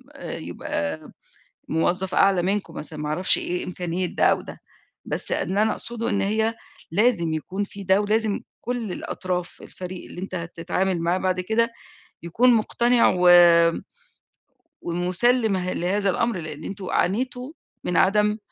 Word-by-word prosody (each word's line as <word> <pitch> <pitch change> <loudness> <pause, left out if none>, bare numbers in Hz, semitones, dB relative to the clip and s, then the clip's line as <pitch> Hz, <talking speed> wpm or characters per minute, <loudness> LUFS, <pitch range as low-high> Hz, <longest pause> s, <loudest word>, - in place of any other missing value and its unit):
آآ - - -5
يبقى 80 -1 -4 0.6
موظّف 180 +3 0
أعلى 195 -2 +4
منكم 195 +3 -2
مثلًا 155 0 -7
ما 150 - -3
أعرفش 180 +5 +4
إيه 180 0 -3
إمكانية 180 0 -3
ده - - 0
أو - - +4
ده، - - -11 0.5
بس - - -1
اللي 195 +4 0
أنا 220 - +2
أقصده 235 -1 -3
إن 200 - +1
هي 220 +3 0 0.4
لازم 195 -5 +2
يكون 190 +6 -3
في 200 0 -10
ده 190 +2 +4
ولازم 215 0 0 0.2
كل 235 -5 -3
الأطراف 180 0 -4
الفريق 180 0 -8
اللي - - -9
أنت 190 - -6
هتتعامل 175 +1 -2
معاه 170 +2 +1
بعد 185 -1 0
كده، 225 +5 +1 0.5
يكون 240 +9 +3
مُقتنع 235 +2 +3
و 180 0 +5 1.5
ومُسَلِّم 190 +6 +1
ه 185 0 -2
لهذا 195 +3 0
الأمر، 230 +1 -1
لإن 155 -1 -7
أنتم 190 +1 -6
عانيتوا 250 +6 -1 0.3
من 180 - 0
عدم 210 +2 +3
190 Hz, 145 wpm, -24 LUFS, 175-220 Hz, 1.5 s, و